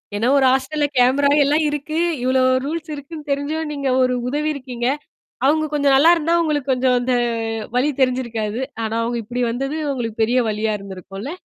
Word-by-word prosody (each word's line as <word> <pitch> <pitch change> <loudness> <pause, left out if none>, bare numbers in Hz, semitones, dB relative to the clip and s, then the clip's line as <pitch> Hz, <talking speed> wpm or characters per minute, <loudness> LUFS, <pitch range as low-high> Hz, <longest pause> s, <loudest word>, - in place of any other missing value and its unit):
ஏன்னா, 225 +4 0
ஒரு 265 - +4
ஹாஸ்டல்ல 290 +3 0
கேமரா 270 +3 +4
எல்லாம் 300 +3 +2
இருக்கு, 295 +2 -4 0.3
இவ்ளோ 260 0 +2 0.2
ரூல்ஸ் 320 +1 -4
இருக்குன்னு 295 +1 -9
தெரிஞ்சும் 300 +3 -2
நீங்க 280 -2 -2
ஒரு 255 0 +1 0.2
உதவி 300 +2 -1
இருக்கீங்க. 250 -3 -4 0.6
அவுங்க 310 +2 +3
கொஞ்சம் 280 -2 +3
நல்லா 320 +5 +6
இருந்தா 330 +1 0
உங்களுக்கு 290 -4 -1
கொஞ்சம் 250 0 +2
அந்த 250 +1 0 0.6
வலி 280 +4 +2
தெரிஞ்சிருக்காது. 235 -3 -1 0.2
ஆனா, 220 +1 -2
அவங்க 235 +1 -2
இப்படி 245 +3 -3
வந்தது 270 +6 -3
உங்களுக்கு 230 -4 -4
பெரிய 245 +3 +2
வலியா 215 0 -1
இருந்திருக்கும்ல? 195 - -8
265 Hz, 165 wpm, -20 LUFS, 245-295 Hz, 0.6 s, நல்லா